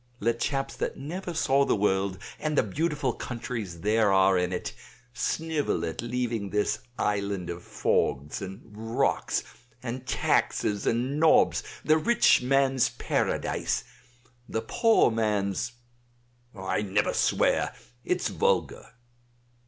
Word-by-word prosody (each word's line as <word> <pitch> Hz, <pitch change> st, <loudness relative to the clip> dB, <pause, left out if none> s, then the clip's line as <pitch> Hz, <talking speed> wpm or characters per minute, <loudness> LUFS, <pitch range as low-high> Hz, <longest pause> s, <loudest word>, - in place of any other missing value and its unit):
Let 115 Hz, +2 st, 0 dB
chaps 135 Hz, -1 st, -1 dB
that -, -, -2 dB
never 175 Hz, +6 st, -5 dB
saw 140 Hz, -3 st, +3 dB
the -, -, +2 dB
world, 95 Hz, -2 st, +1 dB, 0.2 s
and 155 Hz, -1 st, -1 dB
the -, -, +5 dB
beautiful 150 Hz, -, -1 dB
countries 115 Hz, -, -5 dB
there 105 Hz, 0 st, +3 dB
are 95 Hz, 0 st, +5 dB
in 90 Hz, 0 st, +1 dB
it, 90 Hz, -, -3 dB, 0.4 s
snivel 155 Hz, +4 st, -1 dB
at 80 Hz, -, -4 dB
leaving 120 Hz, -3 st, -2 dB
this 105 Hz, 0 st, 0 dB, 0.2 s
island 100 Hz, -3 st, -1 dB
of 85 Hz, +1 st, -7 dB
fogs 70 Hz, -2 st, 0 dB
and 95 Hz, 0 st, -7 dB
rocks 110 Hz, +1 st, -1 dB, 0.4 s
and 125 Hz, +1 st, -5 dB
taxes 105 Hz, -1 st, +1 dB
and 125 Hz, +5 st, 0 dB
nobs, 160 Hz, 0 st, +5 dB, 0.2 s
the 155 Hz, +1 st, +4 dB
rich 235 Hz, -, +4 dB
man's 135 Hz, 0 st, +3 dB
paradise, -, -, -1 dB, 0.7 s
the 110 Hz, -, -2 dB
poor 225 Hz, -, +3 dB
man's 105 Hz, 0 st, 0 dB, 0.8 s
I 95 Hz, +1 st, -1 dB
never 100 Hz, 0 st, +1 dB
swear, -, -, +2 dB, 0.3 s
it's -, -, 0 dB
vulgar." -, -, -1 dB
115 Hz, 120 wpm, -27 LUFS, 100-135 Hz, 0.8 s, the